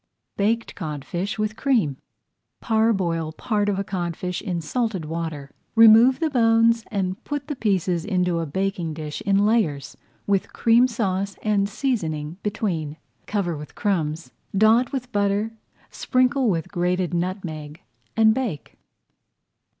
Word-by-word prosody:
BAKED 225 Hz, +3 st, 0 dB
CODFISH 175 Hz, +4 st, -4 dB
WITH 215 Hz, 0 st, -1 dB
CREAM 220 Hz, -, +1 dB, 0.6 s
Parboil 195 Hz, -8 st, +1 dB
part 205 Hz, +3 st, -1 dB
of 200 Hz, -, 0 dB
a 195 Hz, -, -1 dB
codfish 180 Hz, -1 st, -3 dB
in 180 Hz, -5 st, -2 dB
salted 200 Hz, 0 st, -2 dB
water. 155 Hz, -3 st, -5 dB, 0.2 s
Remove 225 Hz, +3 st, +7 dB
the 320 Hz, -2 st, 0 dB
bones 230 Hz, -2 st, +4 dB
and 190 Hz, +2 st, -2 dB
put 290 Hz, -1 st, -4 dB
the 295 Hz, -, -3 dB
pieces 185 Hz, -7 st, 0 dB
into 180 Hz, -4 st, 0 dB
a 165 Hz, -, -3 dB
baking 175 Hz, -1 st, -2 dB
dish 150 Hz, -1 st, -6 dB
in 200 Hz, +1 st, +4 dB
layers 190 Hz, -12 st, 0 dB, 0.3 s
with 200 Hz, -2 st, 0 dB
Cream 235 Hz, +2 st, +4 dB
Sauce 200 Hz, -5 st, -2 dB
and 205 Hz, -2 st, +1 dB
seasoning 165 Hz, -, -2 dB
between. 165 Hz, -8 st, -2 dB, 0.3 s
Cover 190 Hz, -5 st, -1 dB
with 150 Hz, 0 st, -9 dB
crumbs, 165 Hz, -5 st, -1 dB, 0.3 s
dot 225 Hz, +5 st, +4 dB
with 255 Hz, -3 st, -4 dB
butter, 205 Hz, +1 st, 0 dB, 0.4 s
sprinkle 255 Hz, -1 st, +1 dB
with 175 Hz, -1 st, -2 dB
grated 180 Hz, -1 st, 0 dB
nutmeg, 170 Hz, -3 st, -4 dB, 0.3 s
and 220 Hz, -1 st, +6 dB
bake. 225 Hz, -, -4 dB
195 Hz, 130 wpm, -23 LUFS, 170-225 Hz, 0.6 s, Remove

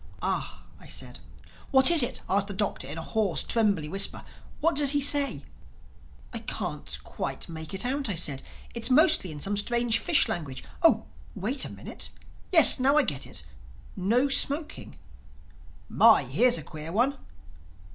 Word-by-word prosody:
"Ah!" -, -, -4 dB, 0.2 s
I -, -, -15 dB
said. -, -, -8 dB, 0.5 s
"What 265 Hz, +3 st, +6 dB
is 335 Hz, -3 st, +8 dB
it?" 250 Hz, +1 st, -1 dB
asked 200 Hz, +1 st, 0 dB
the 200 Hz, -, -6 dB
Doctor 195 Hz, -9 st, -3 dB
in 145 Hz, +4 st, -7 dB
a 165 Hz, -, -6 dB
hoarse, 210 Hz, -4 st, -1 dB
trembly 205 Hz, -9 st, 0 dB
whisper. 195 Hz, +5 st, -3 dB, 0.3 s
"What 330 Hz, +1 st, +2 dB
does 285 Hz, -1 st, +3 dB
he -, -, +2 dB
say?" 285 Hz, 0 st, +1 dB, 0.9 s
"I 230 Hz, -, -4 dB
can't 180 Hz, -8 st, -5 dB
quite 135 Hz, -1 st, -6 dB
make 160 Hz, -2 st, -9 dB
it 195 Hz, -, -1 dB
out," 270 Hz, 0 st, -2 dB
I 200 Hz, -, -1 dB
said. 145 Hz, -5 st, -2 dB, 0.3 s
"It's 235 Hz, +1 st, +1 dB
mostly 260 Hz, -, +3 dB
in 150 Hz, -, -9 dB
some 200 Hz, +7 st, -2 dB
strange 235 Hz, +2 st, 0 dB
fish -, -, +2 dB
language—Oh, 140 Hz, -, -1 dB, 0.3 s
but -, -, -9 dB
wait 255 Hz, +5 st, -1 dB
a -, -, -7 dB
minute!—Yes, 325 Hz, -6 st, +2 dB
now 275 Hz, +3 st, +2 dB
I 300 Hz, -, +5 dB
get 140 Hz, -, -3 dB
it—'No 180 Hz, -, -4 dB
smoking'.... 290 Hz, +3 st, -2 dB, 0.9 s
'My, -, -, +5 dB
here's 240 Hz, -, +3 dB
a -, -, -8 dB
queer 155 Hz, 0 st, -9 dB
one! 255 Hz, +8 st, 0 dB
220 Hz, 155 wpm, -26 LUFS, 165-270 Hz, 0.9 s, is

